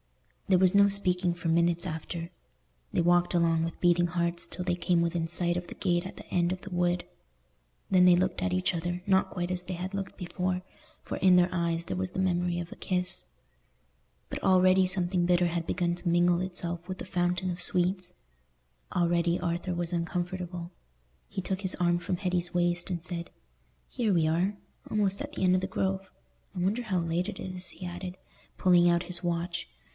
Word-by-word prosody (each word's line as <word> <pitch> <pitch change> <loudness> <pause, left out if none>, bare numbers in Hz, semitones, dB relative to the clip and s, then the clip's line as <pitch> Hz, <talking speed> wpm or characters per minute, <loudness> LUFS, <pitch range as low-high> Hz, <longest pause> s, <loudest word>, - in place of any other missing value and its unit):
There 190 - +5
was 185 0 +4
no 200 0 +7
speaking 180 -3 +1
for 175 0 -5
minutes 170 +1 +2
after. 165 +2 -5 0.6
They - - 0
walked 175 +1 +3
along 165 -1 +3
with 165 0 -4
beating 175 0 +3
hearts 170 0 -1
till 180 - -5
they 175 -1 +1
came 175 0 +1
within 170 -1 0
sight 175 +1 0
of 175 0 -3
the - - -9
gate 175 -2 0
at 185 - -8
the - - -11
end 175 0 +1
of 185 0 -3
the 200 - -9
wood. 175 0 +1 0.8
Then 185 -1 +5
they 180 -1 +7
looked 185 - 0
at 90 - 0
each 90 - +1
other, 175 +1 -3
not 190 -1 +3
quite 175 -1 -3
as 180 -1 -3
they 185 0 -5
had 185 +3 -5
looked 195 -1 -4
before, 180 0 -2 0.4
for - - -4
in 185 -1 +5
their 175 0 +5
eyes 170 -1 -1
there - - -3
was 185 0 -2
the 185 - -4
memory 175 -1 +1
of 170 0 -6
a - - -7
kiss. 180 - -2 1.0
But - - -6
already 185 0 +5
something 180 -1 +1
bitter 175 0 +3
had 170 -1 -2
begun 175 -2 0
to 175 0 -2
mingle 175 +1 +3
itself 175 -2 -3
with 185 - -4
the - - -7
fountain 180 0 0
of 175 +1 -3
sweets: 180 0 +1 0.8
already 170 0 +2
Arthur 175 +1 -2
was 175 0 -3
uncomfortable. 175 0 -3 0.6
He - - -4
took 190 +1 -2
his 190 -2 +3
arm 175 -1 +2
from 180 0 -2
Hetty's 180 -1 -1
waist, 175 +1 +1
and 175 -2 -2
said, 175 -1 -5 0.6
"Here 230 -5 -1
we 165 -4 +3
are, 180 +6 +1 0.3
almost 200 -2 +1
at - - -5
the - - -3
end 185 0 +5
of 185 - +1
the - - -2
Grove. 190 0 -2 0.5
I - - -3
wonder 200 +7 +1
how 200 -6 -1
late 170 +3 -1
it - - -7
is," 185 -1 -5
he 185 - -7
added, 180 +1 -6 0.4
pulling 175 -1 +5
out 170 0 +2
his 180 0 -2
watch. 170 - -2
175 Hz, 200 wpm, -29 LUFS, 175-185 Hz, 1.0 s, no